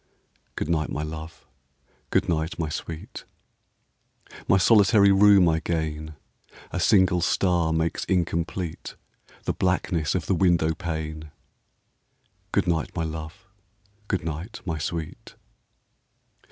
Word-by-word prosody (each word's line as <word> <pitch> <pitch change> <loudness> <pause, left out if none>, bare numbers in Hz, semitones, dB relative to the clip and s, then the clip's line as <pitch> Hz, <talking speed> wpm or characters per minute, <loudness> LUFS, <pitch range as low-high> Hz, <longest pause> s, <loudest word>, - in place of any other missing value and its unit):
Good - - -3
night, 80 -2 0
my 75 - -3
love! 80 +1 -8 0.6
good - - +1
night, 80 0 -1
my 80 -2 -2
sweet! 80 +1 -7 1.2
My 95 - +5
solitary 100 0 +5
room 100 -2 +6
I 80 -1 +2
gain. 80 -2 -3 0.6
A 90 - -2
single 95 -2 +4
star 85 -1 +1
makes 80 +1 -1
incomplete 85 -1 -2 0.5
The - - -1
blackness 90 -4 0
of 90 - -1
the - - +1
window 85 -3 +2
pane. 80 -1 -5 1.2
Good - - +1
night, 85 -3 0
my 85 - -1
love! 80 +4 -7 0.6
good 95 -5 -2
night, 85 +7 -5
my 80 -4 -3
sweet! 80 +1 -5
85 Hz, 115 wpm, -25 LUFS, 80-90 Hz, 1.2 s, room